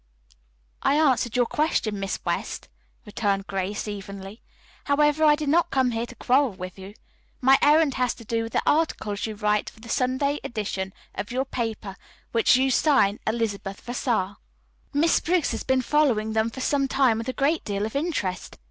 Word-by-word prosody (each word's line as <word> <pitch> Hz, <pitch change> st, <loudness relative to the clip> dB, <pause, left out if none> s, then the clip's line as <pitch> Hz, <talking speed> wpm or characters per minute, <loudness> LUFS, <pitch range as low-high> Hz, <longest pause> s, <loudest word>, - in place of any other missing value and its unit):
"I 280 Hz, -, +2 dB
answered 260 Hz, -6 st, +2 dB
your 245 Hz, -1 st, +3 dB
question, 230 Hz, -7 st, 0 dB
Miss 195 Hz, 0 st, -2 dB
West," -, -, -3 dB, 0.4 s
returned 200 Hz, -2 st, -1 dB
Grace 195 Hz, +1 st, -3 dB
evenly. 200 Hz, +1 st, -8 dB, 0.4 s
"However, 295 Hz, +2 st, +2 dB
I 300 Hz, -1 st, +6 dB
did 300 Hz, -1 st, -3 dB
not 340 Hz, +3 st, +3 dB
come 260 Hz, -2 st, +2 dB
here 230 Hz, +1 st, -2 dB
to 250 Hz, -, -12 dB
quarrel 255 Hz, +1 st, +2 dB
with 185 Hz, 0 st, -8 dB
you. 195 Hz, +2 st, -10 dB, 0.4 s
My 270 Hz, +1 st, +5 dB
errand 300 Hz, -1 st, +4 dB
has 250 Hz, -2 st, 0 dB
to 230 Hz, -, -13 dB
do 230 Hz, +1 st, -1 dB
with 225 Hz, 0 st, -6 dB
the -, -, +1 dB
articles 225 Hz, -10 st, 0 dB
you 215 Hz, -, -5 dB
write 210 Hz, 0 st, 0 dB
for -, -, -20 dB
the 230 Hz, +1 st, -12 dB
Sunday 260 Hz, +4 st, 0 dB
edition 195 Hz, -4 st, -3 dB, 0.2 s
of 205 Hz, -, -5 dB
your 260 Hz, +2 st, -1 dB
paper 220 Hz, -6 st, -4 dB, 0.3 s
which 230 Hz, +1 st, +4 dB
you 265 Hz, +1 st, +2 dB
sign 250 Hz, -8 st, +3 dB
'Elizabeth 210 Hz, -3 st, -2 dB
Vassar.' 225 Hz, -5 st, -2 dB, 0.5 s
Miss 315 Hz, +4 st, +3 dB
Briggs 350 Hz, -1 st, +1 dB
has 225 Hz, -, -3 dB
been 260 Hz, -1 st, +1 dB
following 240 Hz, -7 st, +2 dB
them 220 Hz, +1 st, +1 dB
for 260 Hz, +3 st, -8 dB
some 275 Hz, 0 st, +1 dB
time 260 Hz, -4 st, +2 dB
with 230 Hz, -, -4 dB
a -, -, -2 dB
great 295 Hz, +4 st, +1 dB
deal 205 Hz, -1 st, -2 dB
of 220 Hz, -, -6 dB
interest. 280 Hz, -, -2 dB
235 Hz, 180 wpm, -25 LUFS, 210-280 Hz, 0.5 s, I